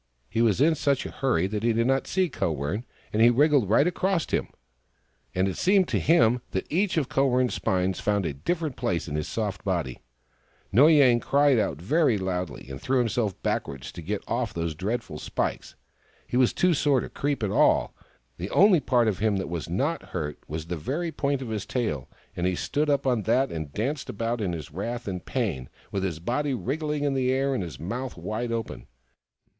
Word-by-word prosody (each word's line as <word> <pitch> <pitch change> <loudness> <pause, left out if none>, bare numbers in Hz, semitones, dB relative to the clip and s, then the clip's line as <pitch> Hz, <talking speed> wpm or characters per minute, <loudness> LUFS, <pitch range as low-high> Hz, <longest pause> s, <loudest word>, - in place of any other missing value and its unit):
He 115 +4 -1
was 110 -3 +3
in 160 +4 +5
such 140 -3 0
a - - -5
hurry 120 -11 +1
that 105 +2 -2
he 115 0 +2
did 115 +1 +1
not 135 +1 +1
see 185 -1 +1
Kowern, 85 - -2 0.3
and 110 - +2
he 120 - +8
wriggled 140 -3 +3
right 125 +7 +5
across 180 0 0
him - - -1 0.4
— - - -39
and 95 +1 +2
it 95 - -3
seemed 190 -1 +3
to - - +1
him 125 -7 +4
that 95 - -1
each 185 +2 +1
of 145 -5 +1
Kowern 130 -2 +2
's - - -4
spines 95 0 0
found 105 -2 0
a 80 - -2
different 155 - -2
place 85 -3 -1
in 75 - -5
his 75 0 -2
soft 105 -4 -3
body. 85 -10 -2 0.7
Noy 140 +11 +6
Yang 130 -5 +6
cried 140 -1 +3
out 105 - -1
very 135 - +2
loudly 90 -4 -3
and 65 0 -8
threw 130 0 +1
him 120 -2 +1
self 105 -5 -1
backwards 65 -2 -2
to - - -9
get 100 +5 -3
off 115 -3 -2
those 85 -1 -2
dreadful 95 -1 -3
spikes. - - -3 0.5
He - - -5
was 125 -1 +4
too 180 -1 +2
sore 140 -4 +2
to - - -5
creep 140 -4 -2
at 100 - 0
all: - - +3 0.4
the 90 +3 -5
only 195 - +5
part 120 -5 +2
of 105 -4 0
him 105 -1 +1
that 95 - -3
was 85 -1 -4
not 140 - 0
hurt 75 -4 -5
was 80 +1 -5
the 85 +1 -4
very 150 - -2
point 140 -3 -1
of 120 - -6
his 105 -2 -2
tail, 75 - -2 0.3
and 90 +1 0
he 90 - 0
stood 150 - -1
up 140 -1 +1
on 125 -4 +2
that 125 +5 +2
and 80 -3 -5
danced 135 - -3
about 115 0 -2
in 95 -4 -1
his 80 -3 -6
wrath 115 +8 -4
and 90 -3 -4
pain, 65 -1 -2 0.2
with 100 - -1
his 90 -5 -2
body 130 - -1
wriggling 150 +4 -2
in 145 -1 +1
the 130 -1 +1
air, 135 +1 +1
and 130 - -1
his 80 -8 -7
mouth 120 - -4
wide 115 +2 -3
open. 115 -1 -4
115 Hz, 215 wpm, -26 LUFS, 90-140 Hz, 0.7 s, he